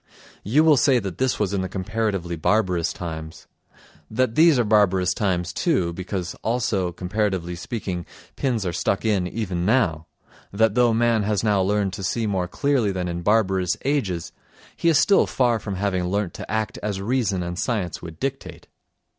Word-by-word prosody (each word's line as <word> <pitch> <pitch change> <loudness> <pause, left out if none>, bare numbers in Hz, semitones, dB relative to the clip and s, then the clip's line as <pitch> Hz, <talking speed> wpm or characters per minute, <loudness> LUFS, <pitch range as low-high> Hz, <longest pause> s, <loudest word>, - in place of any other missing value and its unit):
You 135 +10 +3
will 155 -3 +5
say 130 +1 +4
that 95 -6 -4
that 130 -1 +1
was 100 -2 0
in 100 - 0
the 95 - -3
comparatively 95 -3 -2
barbarous 90 0 +1
times; 80 -2 -7 0.6
that 120 +1 0
these 160 +1 +5
are 120 - +3
barbarous 95 -4 +3
times 90 -4 -1
too, 90 - 0
because 90 0 -4
also, 110 -6 0
comparatively 90 -1 -2
speaking, 90 -2 -5 0.3
pins 120 -7 -1
are 90 - -2
stuck 95 +4 -1
in 100 -5 +1
even 90 -4 -3
now; 90 -8 +1 0.4
that 110 +1 +2
though 120 0 +4
man 115 -1 +2
has 105 0 0
now 105 -3 +2
learned 100 0 0
to 100 - -6
see 115 +4 -1
more 95 -4 -1
clearly 130 0 +1
than 90 -1 -3
in 85 0 -3
barbarous 95 -3 +2
ages, 105 - -1 0.4
he 170 - +1
is 160 - +4
still 200 - +4
far 120 -3 +1
from 100 -2 -5
having 95 -2 -1
learnt 100 0 -1
to - - -8
act 110 0 -2
as 100 -2 -3
reason 105 -4 0
and 85 +1 -5
science 110 -5 -2
would 80 -1 -9
dictate. 135 0 -5
100 Hz, 175 wpm, -23 LUFS, 90-115 Hz, 0.6 s, will